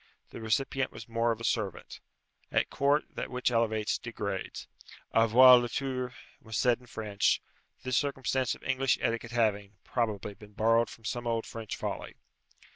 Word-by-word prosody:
The -, -, -8 dB
recipient 130 Hz, +4 st, 0 dB
was 110 Hz, -1 st, -10 dB
more 115 Hz, 0 st, +1 dB
of 115 Hz, -, -3 dB
a -, -, -8 dB
servant. 105 Hz, -6 st, -2 dB, 0.5 s
At -, -, +1 dB
court 145 Hz, +2 st, +2 dB
that -, -, -4 dB
which 125 Hz, 0 st, 0 dB
elevates, 110 Hz, -2 st, +1 dB
degrades. 100 Hz, -4 st, -5 dB, 0.5 s
Avoir 120 Hz, +3 st, +8 dB
le 120 Hz, 0 st, -2 dB
tour 130 Hz, 0 st, -3 dB, 0.3 s
was 110 Hz, -2 st, -5 dB
said 120 Hz, +1 st, +3 dB
in 125 Hz, -, -18 dB
French; 105 Hz, -3 st, 0 dB, 0.4 s
this 130 Hz, -1 st, 0 dB
circumstance 130 Hz, -2 st, 0 dB
of -, -, -18 dB
English 130 Hz, 0 st, +1 dB
etiquette 115 Hz, 0 st, -1 dB
having, 105 Hz, -4 st, 0 dB
probably, 105 Hz, -4 st, -2 dB
been 105 Hz, +1 st, -15 dB
borrowed 115 Hz, +2 st, +3 dB
from 115 Hz, -, -13 dB
some 120 Hz, +2 st, -3 dB
old 115 Hz, -1 st, 0 dB
French 115 Hz, -2 st, -6 dB
folly. -, -, -5 dB
115 Hz, 160 wpm, -30 LUFS, 110-125 Hz, 0.5 s, Avoir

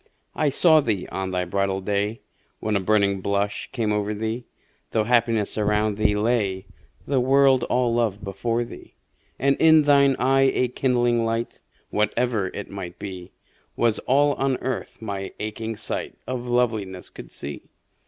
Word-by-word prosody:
I 150 Hz, -, +2 dB
saw 155 Hz, +3 st, +5 dB
thee 105 Hz, -8 st, -2 dB
on 95 Hz, 0 st, -3 dB
thy 90 Hz, -1 st, -1 dB
bridal 95 Hz, +1 st, -1 dB
day 105 Hz, +3 st, -2 dB, 0.4 s
When 110 Hz, -1 st, -1 dB
a -, -, +3 dB
burning 100 Hz, 0 st, +2 dB
blush 100 Hz, +1 st, -1 dB
came 110 Hz, -4 st, -1 dB
o'er 105 Hz, 0 st, -1 dB
thee, 110 Hz, +3 st, -3 dB, 0.4 s
Though 110 Hz, -, +1 dB
happiness 115 Hz, -2 st, +1 dB
around 105 Hz, 0 st, +1 dB
thee 105 Hz, -1 st, +2 dB
lay, 105 Hz, -3 st, 0 dB, 0.4 s
The 140 Hz, -2 st, +1 dB
world 135 Hz, 0 st, +4 dB
all 125 Hz, -1 st, +1 dB
love 110 Hz, -4 st, 0 dB
before 115 Hz, +4 st, -1 dB
thee: 115 Hz, -, -12 dB, 0.4 s
And 140 Hz, +2 st, +2 dB
in 160 Hz, -1 st, +6 dB
thine 140 Hz, -2 st, +5 dB
eye 135 Hz, +1 st, +3 dB
a 125 Hz, -, +1 dB
kindling 120 Hz, -2 st, +1 dB
light 115 Hz, +1 st, -2 dB, 0.3 s
(Whatever 110 Hz, -1 st, 0 dB
it 100 Hz, -, -5 dB
might 90 Hz, -3 st, -7 dB
be) 95 Hz, -2 st, -8 dB, 0.4 s
Was 115 Hz, -2 st, +1 dB
all 145 Hz, +2 st, +4 dB
on 135 Hz, -1 st, +1 dB
Earth 130 Hz, 0 st, -4 dB
my 100 Hz, -2 st, -4 dB
aching 110 Hz, +1 st, -4 dB
sight 105 Hz, -, -4 dB
Of 125 Hz, -1 st, -4 dB
Loveliness 110 Hz, -7 st, -1 dB
could -, -, -11 dB
see. 70 Hz, 0 st, -7 dB
110 Hz, 155 wpm, -24 LUFS, 100-125 Hz, 0.4 s, in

